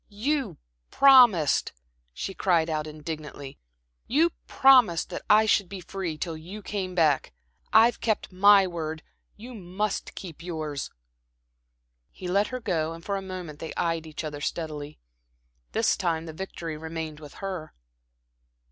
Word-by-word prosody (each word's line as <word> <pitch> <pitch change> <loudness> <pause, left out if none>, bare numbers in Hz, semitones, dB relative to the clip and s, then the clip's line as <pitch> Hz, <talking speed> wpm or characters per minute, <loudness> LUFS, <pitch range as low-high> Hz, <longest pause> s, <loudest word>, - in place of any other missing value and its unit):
"You 225 - -2 0.3
promised," 245 - +5 0.4
she 195 - -5
cried 170 -4 +1
out 155 0 -2
indignantly, 150 -2 -7 0.5
"you 320 +7 +3 0.2
promised 250 -11 +5
that - - -4
I 215 +1 +6
should 200 -3 +2
be 195 0 -6
free 180 -3 -5
till 165 0 -4
you 185 +7 -9
came 190 -3 -4
back. 155 -5 +2 0.4
I've 225 +2 +5
kept 220 -3 -1
my 200 +1 +6
word, 160 -2 -5 0.3
you 240 +4 -10
must 195 0 -3
keep 170 -5 -9
yours." 155 -5 -4 1.2
He 185 - -9
let 200 +3 +2
her 255 - -5
go 165 -8 -1
and 165 +1 -12
for 200 - -1
a 195 - -3
moment 180 -5 -7
they 160 - -7
eyed 165 -2 -1
each 155 +1 -6
other 150 -2 -5
steadily. 150 -2 -4 0.7
This - - +2
time 165 -2 -1
the 160 - -7
victory 165 -2 -6
remained 160 -1 -6
with 150 -2 -12
her. 185 -5 -6
175 Hz, 145 wpm, -26 LUFS, 155-205 Hz, 1.2 s, I